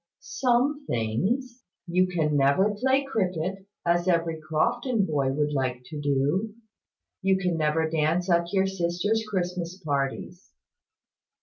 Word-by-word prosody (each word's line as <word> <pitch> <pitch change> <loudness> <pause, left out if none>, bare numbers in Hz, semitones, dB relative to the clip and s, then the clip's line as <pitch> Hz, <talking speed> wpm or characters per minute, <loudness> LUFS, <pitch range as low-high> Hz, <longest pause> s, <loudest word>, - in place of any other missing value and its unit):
"Some 255 +5 0
things. 215 - -1 0.2
You 180 +2 +2
can 160 -4 0
never 145 +9 +3
play 265 +5 +2
cricket, 190 -6 -2 0.2
as 175 +1 +2
every 165 -2 +1
Crofton 190 - 0
boy 140 -5 0
would 150 +2 0
like 130 -2 -1
to 150 -2 -5
do. 145 +10 0 0.7
You 190 0 +3
can 180 -2 0
never 160 0 +1
dance 160 +3 0
at 170 -1 +2
your 195 -1 +2
sisters' 190 +4 0
Christmas 180 -2 -2
parties." 150 +2 -3
175 Hz, 125 wpm, -26 LUFS, 155-195 Hz, 0.7 s, never